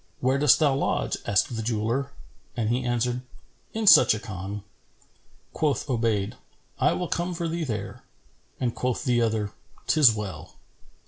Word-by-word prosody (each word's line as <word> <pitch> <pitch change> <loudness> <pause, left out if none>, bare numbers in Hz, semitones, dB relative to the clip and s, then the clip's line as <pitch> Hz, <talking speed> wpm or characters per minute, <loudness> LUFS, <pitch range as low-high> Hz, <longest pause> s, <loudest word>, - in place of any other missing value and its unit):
"Where 130 +2 +1
dost 150 -1 +6
thou 150 -4 +3
lodge?" 135 - -1
asked 115 +5 +1
the 115 - -3
jeweller; 115 +5 -1 0.5
and 110 -2 0
he 125 +1 0
answered, 120 0 -1 0.5
"In 225 0 -1
such 190 - +8
a - - -5
Khan." 100 0 -6 0.9
Quoth 150 -3 0
Obayd, 115 -4 0 0.5
"I - - +3
will 180 - -2
come 175 +2 -2
for 170 0 -2
thee 165 +1 -2
there;" 110 -8 -5 0.6
and 120 -3 -1
quoth 125 -1 -2
the 125 -4 +2
other 110 -2 0 0.3
"'Tis 150 -7 +6
well." 100 -8 -6
120 Hz, 150 wpm, -26 LUFS, 110-140 Hz, 0.9 s, such